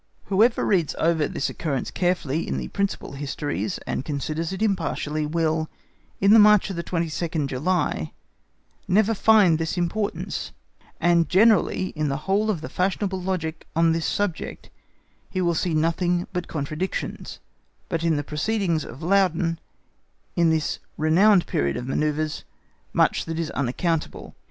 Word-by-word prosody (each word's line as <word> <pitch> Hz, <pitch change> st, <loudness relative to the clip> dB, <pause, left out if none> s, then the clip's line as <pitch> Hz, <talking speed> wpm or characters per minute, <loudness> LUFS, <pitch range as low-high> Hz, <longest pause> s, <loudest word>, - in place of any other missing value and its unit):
Whoever 225 Hz, +5 st, +4 dB
reads 175 Hz, -7 st, +1 dB
over 160 Hz, -2 st, +2 dB
this -, -, -2 dB
occurrence 140 Hz, -5 st, -3 dB
carefully 170 Hz, -4 st, -1 dB
in -, -, -2 dB
the -, -, -4 dB
principal 200 Hz, -1 st, -2 dB
histories,(*) 145 Hz, +6 st, -3 dB
and -, -, -2 dB
considers 155 Hz, +3 st, -3 dB
it 190 Hz, +3 st, -2 dB
impartially, 160 Hz, -6 st, -1 dB
will, 160 Hz, 0 st, 0 dB, 0.5 s
in 200 Hz, +2 st, +5 dB
the 225 Hz, -, +8 dB
march 210 Hz, -1 st, +6 dB
of -, -, -5 dB
the 170 Hz, -, -3 dB
22nd 165 Hz, -2 st, -2 dB
July, 135 Hz, -, -1 dB, 0.8 s
never 210 Hz, +4 st, +3 dB
find 205 Hz, -6 st, +5 dB
this 165 Hz, +2 st, -2 dB
importance; 190 Hz, +4 st, -2 dB, 0.5 s
and 170 Hz, -1 st, +3 dB
generally 200 Hz, -2 st, +3 dB
in 155 Hz, -2 st, -2 dB
the 140 Hz, -, -1 dB
whole 205 Hz, +3 st, +1 dB
of 185 Hz, -8 st, -1 dB
the -, -, -5 dB
fashionable 190 Hz, +1 st, -1 dB
logic 175 Hz, -4 st, -3 dB
on 165 Hz, 0 st, +4 dB
this 165 Hz, 0 st, 0 dB
subject, 205 Hz, -5 st, -3 dB, 0.6 s
he 185 Hz, -, -3 dB
will 175 Hz, -2 st, +2 dB
see 165 Hz, 0 st, 0 dB
nothing 175 Hz, +2 st, +1 dB
but 180 Hz, -1 st, -3 dB
contradictions; 155 Hz, +5 st, -4 dB, 0.5 s
but 165 Hz, -1 st, -2 dB
in 165 Hz, -2 st, +2 dB
the 145 Hz, -, -2 dB
proceedings 165 Hz, +1 st, -1 dB
of 135 Hz, +6 st, -10 dB
Laudon, 175 Hz, -2 st, +2 dB, 0.8 s
in 170 Hz, -1 st, +3 dB
this 160 Hz, -2 st, 0 dB, 0.2 s
renowned 180 Hz, +5 st, +4 dB
period 70 Hz, 0 st, -1 dB
of 125 Hz, -, -5 dB
manœuvres, 150 Hz, +3 st, -1 dB, 0.5 s
much -, -, +2 dB
that 165 Hz, -1 st, -4 dB
is 165 Hz, -1 st, -2 dB
unaccountable. 150 Hz, +5 st, -2 dB
170 Hz, 145 wpm, -24 LUFS, 155-190 Hz, 0.8 s, the